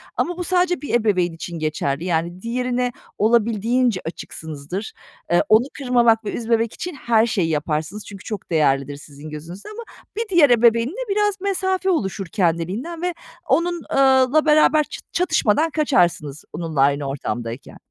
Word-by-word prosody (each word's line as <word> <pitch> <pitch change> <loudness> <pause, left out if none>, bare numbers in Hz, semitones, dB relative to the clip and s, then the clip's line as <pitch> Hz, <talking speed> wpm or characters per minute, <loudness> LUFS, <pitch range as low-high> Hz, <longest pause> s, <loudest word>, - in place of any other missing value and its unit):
ama 355 0 -1
bu 355 - -3
sadece 360 0 +1
bir 290 - -5
ebeveyn 200 -7 +2
için 165 +1 -7
geçerli. 155 0 -2
Yani, 175 +1 -1
diğerine 250 +2 -1 0.3
olabildiğince 230 0 +2
açıksınızdır. 160 +3 -6 0.4
Eee, 175 - +4
onu 220 +2 +6
kırmamak 240 -5 +3
ve 205 - -2
üzmemek 230 -1 0
için 360 -3 -6
her 235 -4 +2
şeyi 195 -8 0
yaparsınız 155 +6 -2
çünkü 195 -2 -10
çok 210 -5 -6
değerlidir 145 -3 +1
sizin 145 +1 -11
gözünüzde 165 - -9
ama 440 +2 -8 0.3
bir 455 -1 -2
diğer 345 -7 +5
ebeveynle 240 - +3
biraz 415 -1 +1
mesafe 380 -1 0
oluşur 195 - -1
kendiliğinden 190 - -1
ve 360 0 -1 0.3
onun 345 +1 +1
eee, - - 0 0.4
la 310 0 +4
beraber 305 0 +5
çı - - -9
çatışmadan 320 - +2
kaçarsınız 175 - 0
onunla 160 -5 -2
aynı 140 +1 +2
ortamdayken. 120 -3 -5
225 Hz, 145 wpm, -21 LUFS, -, 0.4 s, onu